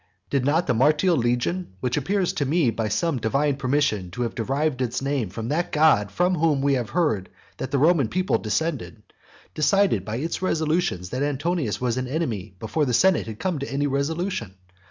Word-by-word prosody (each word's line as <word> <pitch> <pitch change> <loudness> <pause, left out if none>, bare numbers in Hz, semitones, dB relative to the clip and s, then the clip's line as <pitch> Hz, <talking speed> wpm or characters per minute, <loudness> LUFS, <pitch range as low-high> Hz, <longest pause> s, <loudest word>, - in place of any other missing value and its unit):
did 140 -2 +1
not 155 +6 +2
the - - +1
Martial 150 +8 +3
legion 120 - -1
(which 125 +2 -1
appears 185 +5 0
to 145 - -1
me 145 -2 +2
by 110 0 -2
some 130 - 0
divine 135 +6 +1
permission 130 -9 0
to 110 +8 -3
have 115 - -3
derived 135 +3 -1
its 125 0 -1
name 135 -6 -1
from 115 +5 -5
that 170 +4 -1
god 150 -10 +4
from 180 +1 +1
whom 155 -4 +2
we 140 +1 +2
have 125 -5 -1
heard 130 - 0 0.3
that 130 - -4
the 140 - 0
Roman 150 -2 +4
people 185 +8 0
descended) 115 0 -3 0.5
decide 185 - +2
by 110 +2 -4
its 160 +9 -3
resolutions 160 - 0
that 130 - -2
Antonius 145 - -1
was 125 -1 -1
an 130 0 -2
enemy 115 - -3
before 110 - -1
the 125 -3 +1
senate 185 +2 +3
had 110 -1 -6
come 180 0 -2
to 140 - -5
any 140 +1 0
resolution? 140 - -2
140 Hz, 195 wpm, -24 LUFS, 115-160 Hz, 0.5 s, god